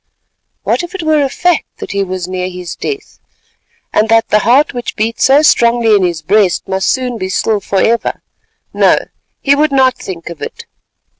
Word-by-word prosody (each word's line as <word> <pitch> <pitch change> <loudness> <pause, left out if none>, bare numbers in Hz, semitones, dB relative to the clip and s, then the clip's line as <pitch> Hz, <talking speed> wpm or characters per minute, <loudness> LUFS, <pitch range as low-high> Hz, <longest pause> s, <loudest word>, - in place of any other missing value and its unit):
What - - 0
if 350 +2 -8
it 370 - -4
were 310 -1 +2
a 275 - 0
fact 355 +3 0
that - - -7
he 200 0 0
was 185 -1 -4
near 185 0 -3
his 180 -2 -7
death, 415 -1 -6 0.7
and 220 +1 +2
that 225 0 +3
the 210 - +4
heart 260 +8 +3
which 245 -2 -5
beat 225 +2 -2
so 275 +3 +5
strongly 235 -5 +3
in 205 - +4
his 170 -4 -1
breast 195 +1 +1
must 190 0 -1
soon 250 -3 -1
be 185 - -3
still 210 +2 0
for 195 0 -2
ever—no, 230 +1 -1 0.4
he 280 - +3
would 300 +1 +2
not 260 -2 +3
think 170 -2 -8
of 165 - -11
it. - - -7
225 Hz, 190 wpm, -14 LUFS, 190-270 Hz, 0.7 s, so